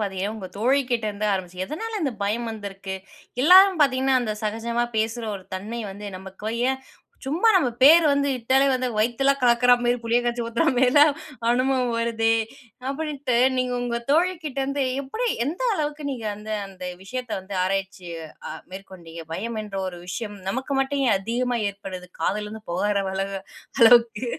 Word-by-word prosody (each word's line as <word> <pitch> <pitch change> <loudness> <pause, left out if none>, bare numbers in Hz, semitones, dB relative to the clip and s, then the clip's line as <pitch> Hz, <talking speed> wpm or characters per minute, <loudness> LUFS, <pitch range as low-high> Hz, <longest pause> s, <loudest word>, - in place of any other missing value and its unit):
பாத்தீங்கன்னா, 200 0 -2
உங்க 195 -4 -7
தோழி 260 +6 +3
கிட்டேந்து 215 -3 -1
ஆரம்பிச்சு. 185 -1 -3
எதனால 430 +8 -4
இந்த 275 -4 0
பயம் 230 +3 -1
வந்திருக்கு? 195 -2 -6 0.5
எல்லாரும் 370 +3 +7
பாத்தீங்கன்னா, 265 -1 +3
அந்த 220 -3 -2
சகஜமா 230 +3 -1
பேசுற 225 +2 -1
ஒரு 190 - -13
தன்மை 215 +5 -5
வந்து 205 +1 -8
நமக்கு 190 +3 -7 0.2
ஏன், 265 0 -3 0.4
சும்மா 325 +11 +2
நம்ம 320 -10 +4
பேர் 320 +5 +8
வந்து 280 0 +2
கூப்டாலே 260 +4 +3
வந்து 255 0 -1
வயித்தலாம் 270 +5 +2
கலக்குற 245 0 +5
மாரி 240 +1 +2
புளிய 230 +1 +3
கரைச்சு 240 0 -1
ஊத்துற 235 +7 0
மாரிலாம் 270 +4 +6 0.4
அனுபவம் 255 0 +2
வருதே, 225 -1 +1 0.6
அப்டின்ட்டு 280 -3 -2 0.2
நீங்க 255 0 0
உங்க 240 -1 -2
தோழிகிட்டேருந்து 295 -5 0 0.2
எப்டி 360 - -3 0.2
எந்த 330 +9 -4
அளவுக்கு 300 -2 -3
நீங்க 245 -5 -5
அந்த 210 +1 -9 0.2
அந்த 185 -1 -10 0.2
விஷயத்த 250 +3 -6
வந்து 190 +1 -8
ஆராய்ச்சி 195 -1 -3 0.4
அ - - -4 0.2
மேற்கொண்டீங்க, 175 -4 -10
பயம் 225 +5 -4
என்ற 200 -2 -7
ஒரு 175 -1 -8
விஷயம் 205 +2 -5
நமக்கு 260 +7 -2
மட்டும் 275 +1 0
ஏன் 220 - +4
அதிகமா 240 +4 -1
ஏற்படுது? 190 -2 -8
காதுலருந்து 210 +5 -2
புகறளவ 195 +2 0 0.7
அளவுக்கு? 230 0 +6
235 Hz, 150 wpm, -24 LUFS, 205-270 Hz, 0.7 s, பேர்